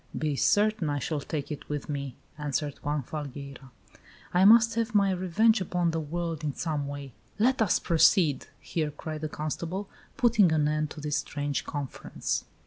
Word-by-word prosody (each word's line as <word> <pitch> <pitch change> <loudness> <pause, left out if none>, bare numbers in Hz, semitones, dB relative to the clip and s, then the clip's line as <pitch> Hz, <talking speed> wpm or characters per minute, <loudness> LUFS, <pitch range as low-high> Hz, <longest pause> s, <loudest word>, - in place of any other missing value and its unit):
"Be 150 -2 0
certain, 205 +1 +2
I 145 - 0
shall 150 +2 -2
take 145 +1 -4
it 150 - -7
with 145 -1 -3
me!" 140 -3 -4 0.2
answered 145 -1 -3
Juan 145 -1 -1
Falgueira. 140 -1 -7 0.6
"I 180 +2 +5
must 230 +2 +7
have 230 -1 -1
my 200 -1 +4
revenge 190 +4 +3
upon 175 -1 0
the 165 - -1
world 165 0 -3
in 145 -2 -2
some 150 -4 -2
way." 140 -2 -7 0.2
"Let 245 +4 +2
us 210 - +4
proceed!" 165 -3 +3
here 155 -3 -2
cried 155 +1 -6
the 155 - -3
constable, 170 +6 -4 0.3
putting 230 - +4
an 150 -2 +2
end 155 0 0
to 150 - -9
this 150 0 -1
strange 145 -1 -3
conference. 145 -3 -3
155 Hz, 170 wpm, -28 LUFS, 145-185 Hz, 0.6 s, must